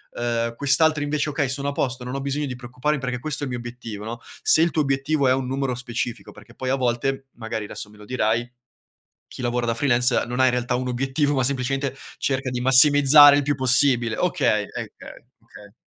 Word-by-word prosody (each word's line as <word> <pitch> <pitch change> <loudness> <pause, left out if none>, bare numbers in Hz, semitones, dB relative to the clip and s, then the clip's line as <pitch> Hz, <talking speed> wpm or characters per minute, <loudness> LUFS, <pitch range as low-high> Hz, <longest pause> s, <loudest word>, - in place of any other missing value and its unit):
ehm, 115 -1 -2
quest'altro 145 +3 +2
invece: 145 +1 -1
"Okay, 140 -2 -1
sono 140 +1 -1
a - - -2
posto 130 -2 -2
non 125 +1 -6
ho 135 - -3
bisogno 140 +2 -2
di 130 -3 -5
preoccuparmi 125 +4 -3
perché 125 -1 -3
questo 150 +4 -3
è - - -1
il - - -5
mio 125 - -3
obiettivo", 120 -3 -8
no? 115 +2 -6 0.2
Se 160 - +5
il 170 - +3
tuo 155 - +1
obiettivo 135 +1 0
è 130 - +4
un 130 -1 -2
numero 135 0 -2
specifico, 120 -1 -5
perché - - -16
poi 130 - -5
a 135 - +2
volte, 135 +1 -2
magari 110 -2 -5
adesso 105 - -8
me 105 - -18
lo 105 - -13
dirai, 115 0 -1 0.8
chi - - -11
lavora 120 0 -1
da 115 - +1
freelancer, 125 0 +2
non 125 +2 -3
ha - - +5
in 130 - +4
realtà 125 0 -2
un 125 +1 -2
obiettivo, 135 +4 -1
ma 130 - +1
semplicemente 135 +1 -1 0.2
cerca 135 -1 -2
di 125 -1 -3
massimizzare 145 +2 +7
il - - 0
più 145 +1 0
possibile. 125 -3 +3
Okay, - - +1
ehm, - - -12 0.3
uhm, - - -13 0.2
okay. 105 -1 -15
130 Hz, 220 wpm, -22 LUFS, 120-140 Hz, 0.8 s, massimizzare